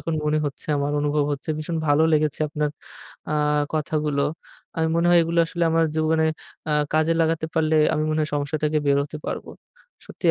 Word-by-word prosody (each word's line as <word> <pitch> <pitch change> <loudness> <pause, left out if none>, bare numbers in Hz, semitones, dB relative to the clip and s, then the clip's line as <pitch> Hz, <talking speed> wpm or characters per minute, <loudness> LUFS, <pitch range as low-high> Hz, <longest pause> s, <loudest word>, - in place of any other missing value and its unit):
এখন 165 - -3
মনে 150 +1 +2
হচ্ছে 140 - -6
আমার। 145 +1 -1
অনুভব 145 0 +1
হচ্ছে। 140 +1 -6
ভীষণ 160 +2 -3
ভালো 145 +1 +4
লেগেছে 150 -1 +1
আপনার 150 0 -1 0.6
আ - - 0 0.4
কথাগুলো। 150 -2 -1 0.6
আমি 160 0 +2
মনে 170 +1 +2
হয় 175 - +6
এগুলো 165 +1 -1
আসলে 170 +1 -1
আমার 165 0 +3
জীবনে 160 0 +2 0.5
আ - - +2 0.2
কাজে 155 +1 +3
লাগাতে 160 0 +1
পারলে 160 -1 +2 0.2
আমি 155 - 0
মনে 155 0 0
হয় 155 - -1
সমস্যা 145 +2 -2
থেকে 150 0 +2
বের 140 0 +4
হতে 145 +1 -8
পারবো। - - -4 0.6
সত্যিই - - 0
155 Hz, 185 wpm, -23 LUFS, 150-160 Hz, 0.6 s, হয়